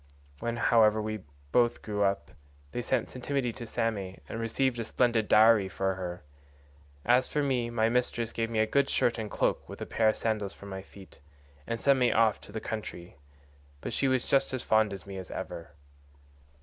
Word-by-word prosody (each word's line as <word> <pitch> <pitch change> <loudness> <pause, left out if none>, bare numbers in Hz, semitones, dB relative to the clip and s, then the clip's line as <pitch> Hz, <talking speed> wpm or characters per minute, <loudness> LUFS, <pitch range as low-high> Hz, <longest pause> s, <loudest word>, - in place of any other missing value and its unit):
When, 120 +5 -2
however, 110 -2 +4
we 110 0 -3 0.3
both 120 -1 +2
grew 105 -1 -3
up, 100 -6 0 0.4
they 120 - -3
sent 120 -1 0
Ctimene 130 -1 -2
to 120 0 -8
Same 105 -5 -2
and 110 - -5
received 120 +2 0
a - - -1
splendid 115 -1 +1
dowry 110 -2 +6
for 95 +2 -1
her. 90 -3 -6 0.8
As 125 +2 +4
for 150 - 0
me, 125 -4 0
my 110 -1 +2
mistress 120 -1 0
gave 115 0 -1
me 115 - -3
a 110 - +4
good 140 +5 +2
shirt 120 -1 +1
and 110 -1 -4
cloak - - -1
with - - -8
a - - -4
pair 110 -1 +2
of - - +1
sandals 105 -3 -2
for - - -12
my 95 -1 -6
feet, 95 -3 -15 0.5
and 115 0 -2
sent 140 +1 +4
me 125 -1 +4
off 110 -2 +3
into - - -14
the 110 - -4
country, 100 -8 -6 0.6
but - - -5
she 135 - +1
was 130 -2 +1
just 135 -1 +2
as 125 - -4
fond 110 -1 +3
of 100 - -7
me 100 -1 -7
as 95 - -7
ever. 80 -3 -7
115 Hz, 200 wpm, -29 LUFS, 100-120 Hz, 0.8 s, dowry